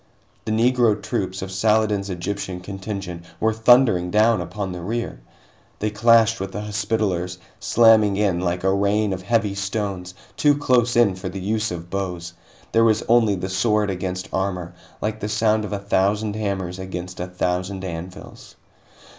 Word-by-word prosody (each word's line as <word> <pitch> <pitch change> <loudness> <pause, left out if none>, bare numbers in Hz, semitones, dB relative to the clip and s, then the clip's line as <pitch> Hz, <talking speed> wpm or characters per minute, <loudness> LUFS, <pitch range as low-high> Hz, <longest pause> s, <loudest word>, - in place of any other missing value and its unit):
The 110 - -2
Negro 115 -1 +3
troops 95 0 -3
of 95 - -6
Saladin's 105 0 +1
Egyptian 95 +1 -4
contingent 95 -2 -6 0.2
were 110 0 +2
thundering 110 -5 +4
down 110 +3 +3
upon 100 -3 -4
the 90 -1 -6
rear! 110 - -3 0.6
They 105 0 -2
clashed 115 +1 +4
with 95 0 -5
the 105 - -4
Hospitallers, 100 -4 -1 0.2
slamming 110 -3 +4
in 100 -4 +1
like 90 0 -2
a 95 0 +3
rain 100 +1 +1
of 90 - -5
heavy 105 0 +1
stones, 100 -2 -3 0.2
too 145 -1 +3
close 125 -4 +2
in 115 -5 +4
for 95 +1 -6
the 95 +1 -6
use 105 +3 -1
of 85 -1 -7
bows. 90 -3 -4 0.4
There 115 - +4
was 110 -1 +3
only 115 -3 +3
the 95 0 -4
sword 105 +1 +1
against 90 0 -4
armor, 90 -3 -2 0.3
like 110 0 -2
the 105 - -4
sound 110 0 +1
of - - -7
a 100 - -1
thousand 100 +2 0
hammers 95 -4 -3
against 90 -1 -6
a 90 - -3
thousand 90 +1 -2
anvils. 90 0 -8
100 Hz, 165 wpm, -22 LUFS, 90-110 Hz, 0.6 s, thundering